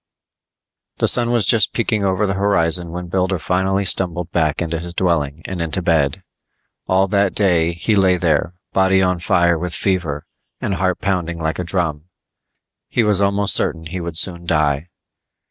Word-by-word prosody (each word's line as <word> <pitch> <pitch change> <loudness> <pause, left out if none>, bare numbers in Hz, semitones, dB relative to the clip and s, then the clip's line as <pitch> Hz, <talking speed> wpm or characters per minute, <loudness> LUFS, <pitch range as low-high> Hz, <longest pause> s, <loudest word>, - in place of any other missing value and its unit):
The - - +1
sun 120 -1 +2
was 120 -4 +2
just 110 +1 +2
peeking 110 -3 0
over 95 +2 +1
the 95 - -1
horizon 90 -4 +1
when 90 +1 -6
Builder 95 +1 -1
finally 95 +3 0
stumbled 90 -2 0
back 80 -3 0
into 85 -1 -2
his 85 +1 -8
dwelling 80 -5 0
and 90 -2 -4
into 85 +3 +1
bed. 80 -5 +1 0.6
All 95 +1 +3
that 100 -1 +1
day, 85 -5 +2
he 95 +6 0
lay 95 -2 +3
there, 85 0 0 0.2
body 95 0 +3
on 90 -1 0
fire 85 -1 +2
with 90 0 -2
fever, 85 -7 -2 0.3
and 100 - -2
heart 95 -1 -1
pounding 85 -3 -1
like 80 0 -3
a - - -1
drum. 85 -4 -2 0.8
He 120 - 0
was 105 -2 +3
almost 100 0 +2
certain 80 -1 0
he 90 +3 -5
would 85 -1 -5
soon 85 -1 0
die. 75 0 0
90 Hz, 170 wpm, -19 LUFS, 85-95 Hz, 0.8 s, All